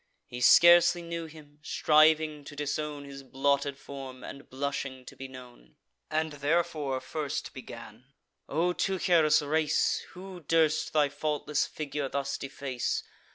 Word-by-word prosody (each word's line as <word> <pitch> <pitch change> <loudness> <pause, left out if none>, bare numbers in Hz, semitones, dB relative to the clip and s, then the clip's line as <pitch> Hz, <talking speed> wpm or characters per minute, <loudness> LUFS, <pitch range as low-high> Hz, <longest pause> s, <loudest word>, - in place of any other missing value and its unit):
He 125 0 -8
scarcely 175 +4 +7
knew 170 -1 -5
him, 150 -2 -15
striving 155 0 +3
to 145 - -10
disown 145 0 -3
His 140 -1 -9
blotted 140 +1 0
form, 135 -2 -9
and 140 +1 -10
blushing 135 -1 -4
to - - -11
be 135 - -8
known; 125 - -14 0.3
And 155 0 -1
therefore 150 -2 0
first 150 +1 -4
began: 115 -2 -11 0.4
"O 170 +5 +1
Teucer's 170 -6 +3
race, 155 +1 +1
Who 185 0 -9
durst 160 -1 +1
thy 150 -2 +4
faultless 150 0 -1
figure 145 -2 -4
thus 140 0 -3
deface? 135 -2 -3
145 Hz, 130 wpm, -29 LUFS, 135-155 Hz, 0.4 s, scarcely